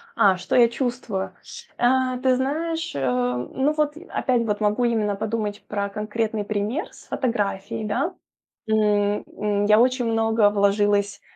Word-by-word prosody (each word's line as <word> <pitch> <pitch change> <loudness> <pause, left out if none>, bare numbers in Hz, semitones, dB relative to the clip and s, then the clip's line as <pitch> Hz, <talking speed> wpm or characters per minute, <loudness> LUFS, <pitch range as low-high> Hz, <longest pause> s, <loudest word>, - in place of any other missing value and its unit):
А, 190 -2 +4
что 180 - -2
я 240 -2 +7
чувствую? 235 -7 -3 0.4
А, 255 +1 +2
ты 255 0 +2
знаешь, 320 +5 -2
а, 125 -2 0
ну 265 - -1
вот, 300 0 0
э, 355 - -12
опять 250 -2 +1 0.2
могу 210 +3 +1
именно 215 -3 +1
подумать 210 0 -3
про 200 -1 -2
конкретный 215 +1 -2
пример 215 - -2
с - - -16
фотографией, 210 -5 -2
да. 270 - -1 0.5
М, 210 -1 +2 0.2
м, 205 -1 0
я 210 +1 +5
очень 250 0 +2
много 225 -2 +3
вложилась, 205 0 +1
215 Hz, 145 wpm, -23 LUFS, 205-250 Hz, 0.5 s, я